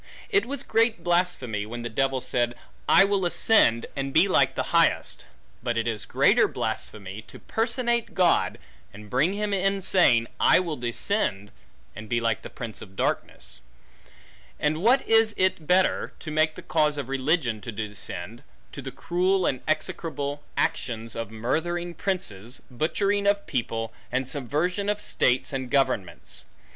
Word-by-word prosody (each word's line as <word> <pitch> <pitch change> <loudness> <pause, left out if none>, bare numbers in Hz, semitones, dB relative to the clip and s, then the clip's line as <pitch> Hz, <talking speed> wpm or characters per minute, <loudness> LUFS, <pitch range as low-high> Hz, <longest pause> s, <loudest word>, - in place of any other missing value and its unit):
It 405 - +3
was 275 0 -4
great 230 -2 +2
blasphemy, 175 - 0
when 120 +1 -6
the - - -2
devil 135 +3 0
said, 120 -1 0 0.3
I - - +8
will 200 -1 +1
ascend, 175 - +4
and 135 0 -3
be 165 +7 +5
like 190 - +3
the - - -3
highest; - - +2 0.3
but 120 -1 -2
it 115 - 0
is 110 -3 -2
greater - - +4
blasphemy, 100 0 -4
to - - -12
personate 235 +1 -1
God, 180 -2 +3 0.3
and 105 0 -13
bring 150 +9 +2
him 205 0 -2
in 195 +1 +1
saying, 155 -11 +4
I - - +6
will 170 -4 -2
descend, 120 - -1 0.4
and 110 -1 -9
be 120 - +1
like 115 -2 0
the - - -9
prince 115 -4 -7
of 95 -2 -12
darkness; - - -3 1.0
and 155 +2 0
what 250 +6 +3
is 225 -1 +4
it 185 -4 +1
better, 185 +1 +2
to 155 - -7
make 155 0 +2
the - - -10
cause 150 -1 +1
of 140 -4 -4
religion 135 -4 0
to 115 - -6
descend, 105 0 -6 0.3
to - - -7
the - - -6
cruel 185 +2 0
and 130 - 0
execrable 155 -3 -2 0.2
actions 115 -1 -2
of 115 -2 -4
murthering 170 +10 -2
princes, 130 - -4
butchery 200 - 0
of 200 0 +2
people, 115 -4 -3 0.2
and 130 0 -1
subversion 155 - -1
of 210 0 0
states 130 -10 +1
and 130 -2 -3
governments? 135 -8 -1
145 Hz, 155 wpm, -26 LUFS, 115-190 Hz, 1.0 s, I